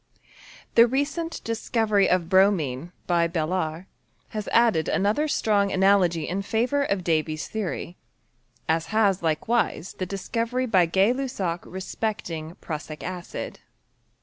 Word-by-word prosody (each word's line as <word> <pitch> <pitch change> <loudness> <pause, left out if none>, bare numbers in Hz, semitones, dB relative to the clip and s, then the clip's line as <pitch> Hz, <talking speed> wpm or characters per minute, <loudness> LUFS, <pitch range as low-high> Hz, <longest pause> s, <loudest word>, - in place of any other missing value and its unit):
The 230 +1 +7
recent 300 +6 -2
discovery 220 -3 +1
of 180 -2 +2
bromine, 175 -6 +2
by 170 -1 +2
Balard, 165 0 -2 0.4
has 215 -1 -5
added 230 -9 +3
another 210 +10 +1
strong 205 -8 +2
analt^ 185 -4 +3
in 190 +3 -2
favour 240 +8 0
of 200 -9 0
Davy's 155 -2 0
theory; 190 -4 -4 0.7
aa 160 +1 +3
has 200 +2 +1
likewise 170 +3 0
the 185 - -2
discovery 230 +6 -2
by 185 -8 +3
Gay 195 +7 +3
LuBsac 225 -11 -2
respecting 185 -4 -4
prussic 155 -1 -7
acid. 180 -1 -6
190 Hz, 120 wpm, -25 LUFS, 170-225 Hz, 0.7 s, The